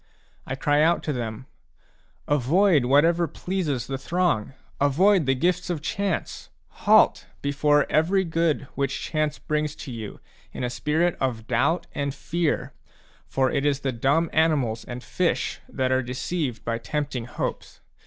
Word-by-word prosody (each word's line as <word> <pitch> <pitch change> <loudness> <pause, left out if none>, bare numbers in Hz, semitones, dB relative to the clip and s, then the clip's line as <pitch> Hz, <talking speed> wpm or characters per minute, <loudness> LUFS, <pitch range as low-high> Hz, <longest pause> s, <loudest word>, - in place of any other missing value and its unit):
I 135 - -2
cry 145 +2 +2
out 170 +2 +3
to 150 - -1
them: 115 -1 -5 0.4
« - - -37
Avoid 150 +2 +3
whatever 165 +6 +4
pleases 160 -12 -2
the 135 -1 -4
throng: 170 -9 0 0.3
avoid 165 +4 +3
the 135 - +3
gifks 180 +5 0
of 175 -3 -1
Chance! 200 0 -3 0.4
Halt - - +5 0.2
before 145 +1 +3
every 180 +5 +2
good 165 -3 0
which 140 -1 -1
Chance 155 -1 -1
brings 150 0 -2
to 135 - -8
you, 110 -3 -7 0.3
in - - -5
a 125 - -1
spirit 150 +8 +1
of 120 -4 -1
doubt 135 +9 +1
and 140 -1 -2
fear; 165 +1 -1 0.5
for 130 -1 +1
it 140 - 0
is 145 -1 +1
the 135 - -1
dumb 140 +7 +1
animals 140 -9 +2
and 125 +1 -7
fish 180 -2 -1
that 130 -1 -1
are 130 0 +3
de 125 0 -6
ceived 130 -2 -3
by 115 0 -2
tempting 140 -1 -3
hopes. 120 - -5
145 Hz, 155 wpm, -25 LUFS, 130-165 Hz, 0.5 s, Halt